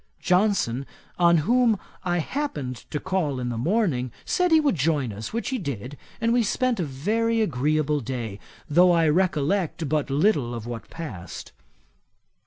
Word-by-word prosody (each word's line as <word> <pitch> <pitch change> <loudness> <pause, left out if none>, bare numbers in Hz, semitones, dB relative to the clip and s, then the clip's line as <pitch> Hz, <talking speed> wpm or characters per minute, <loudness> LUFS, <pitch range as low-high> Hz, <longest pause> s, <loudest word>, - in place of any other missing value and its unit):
Johnson, 180 - +1 0.3
on 170 -1 +5
whom 240 -1 +4 0.3
I 175 -2 0
happened 155 - -3
to 150 - -2
call 170 -8 -1
in 125 -1 -2
the 120 - -3
morning, 150 - +1
said 360 -1 +1
he 320 - +7
would 300 -2 +2
join 145 - 0
us, 105 +3 -6
which 230 +1 -2
he 260 -2 -1
did, 140 - -5 0.2
and 230 0 +2
we 245 - +4
spent 245 +1 0
a - - +1
very 220 +12 0
agreeable 150 - +1
day, 115 -5 -5 0.3
though 175 +4 +5
I 165 -1 +3
recollect 170 0 +1
but 150 0 0
little 140 - +2
of 115 -2 -6
what 120 -1 -7
passed. 100 - -8
160 Hz, 160 wpm, -25 LUFS, 130-205 Hz, 0.3 s, he